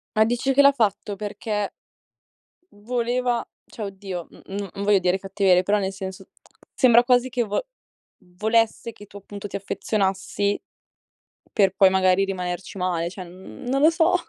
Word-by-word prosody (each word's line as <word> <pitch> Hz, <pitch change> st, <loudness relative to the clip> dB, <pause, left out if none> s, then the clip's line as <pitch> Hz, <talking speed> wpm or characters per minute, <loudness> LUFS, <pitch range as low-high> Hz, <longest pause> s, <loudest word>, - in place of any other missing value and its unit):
Ma 215 Hz, 0 st, +5 dB
dici 245 Hz, +4 st, 0 dB
che 280 Hz, -, +6 dB
l'ha 280 Hz, 0 st, +7 dB
fatto 210 Hz, -4 st, 0 dB
perché, 210 Hz, 0 st, -3 dB, 1.0 s
uhm, 205 Hz, -, -21 dB
voleva 245 Hz, +1 st, -1 dB, 0.2 s
cioè 215 Hz, -, -6 dB
oddio, 190 Hz, -3 st, -6 dB
n -, -, -16 dB
n 200 Hz, 0 st, -5 dB
non 200 Hz, -, -5 dB
voglio 205 Hz, 0 st, +4 dB
dire 185 Hz, +1 st, +1 dB
cattiverie, 190 Hz, -1 st, +3 dB
però, 205 Hz, +3 st, +2 dB
nel 190 Hz, -1 st, -2 dB
senso, 190 Hz, -1 st, -7 dB, 0.5 s
sembra 240 Hz, -2 st, +6 dB
quasi 250 Hz, 0 st, +3 dB
che 245 Hz, -1 st, 0 dB
vo 210 Hz, -, -2 dB, 0.7 s
volesse 225 Hz, +2 st, +1 dB
che 205 Hz, -, -14 dB
tu 205 Hz, 0 st, -12 dB
appunto 200 Hz, 0 st, -8 dB
ti -, -, -8 dB
affezionassi, 200 Hz, 0 st, -1 dB, 0.9 s
per 195 Hz, -2 st, +2 dB
poi 195 Hz, -, +6 dB
magari 190 Hz, 0 st, +3 dB
rimanerci 180 Hz, -1 st, -4 dB
male, 175 Hz, -2 st, -1 dB
cioè, 185 Hz, 0 st, -8 dB
mhmm, 185 Hz, +7 st, -11 dB
non 270 Hz, +2 st, +1 dB
lo 310 Hz, -, +8 dB
so. 330 Hz, +2 st, +2 dB
205 Hz, 165 wpm, -24 LUFS, 190-235 Hz, 1.0 s, lo